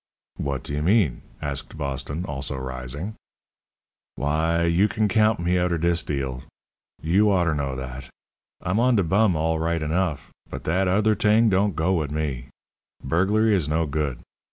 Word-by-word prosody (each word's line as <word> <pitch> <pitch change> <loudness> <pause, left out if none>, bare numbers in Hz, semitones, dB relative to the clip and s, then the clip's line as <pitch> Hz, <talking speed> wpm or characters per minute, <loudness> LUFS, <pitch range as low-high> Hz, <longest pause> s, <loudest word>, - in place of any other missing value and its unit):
"What 70 -2 -3
do - - -6
you 75 - -1
mean?" 90 - +2 0.2
asked 70 +2 -4
Boston, 70 +3 -3
also 70 -1 -3
rising. 65 - -5 1.0
"W'y, 80 +3 +1
you 95 +5 +4
can 110 0 0
count 110 +1 +3
me 90 +1 +1
outer 90 -1 +1
dis 85 +1 +1
deal. 65 -3 -3 0.6
You 95 +7 +3
oughter 85 -4 +2
know 70 -3 -2
that. 65 0 -7 0.5
I'm 90 +4 0
on 125 +1 +4
de 100 - +3
bum 95 +2 +3
all 80 +1 0
right 85 +1 0
enough, 80 -1 -1 0.2
but - - -7
dat 90 +4 +1
other 105 +4 +3
t'ing 110 +2 +3
don't 100 -1 +2
go 85 +5 +1
wit' 80 -5 0
me. 70 -5 -3 0.6
Burglary 100 +9 +2
is 80 -6 0
no 80 +1 +1
good. 70 -3 -2
80 Hz, 160 wpm, -24 LUFS, 70-95 Hz, 1.0 s, you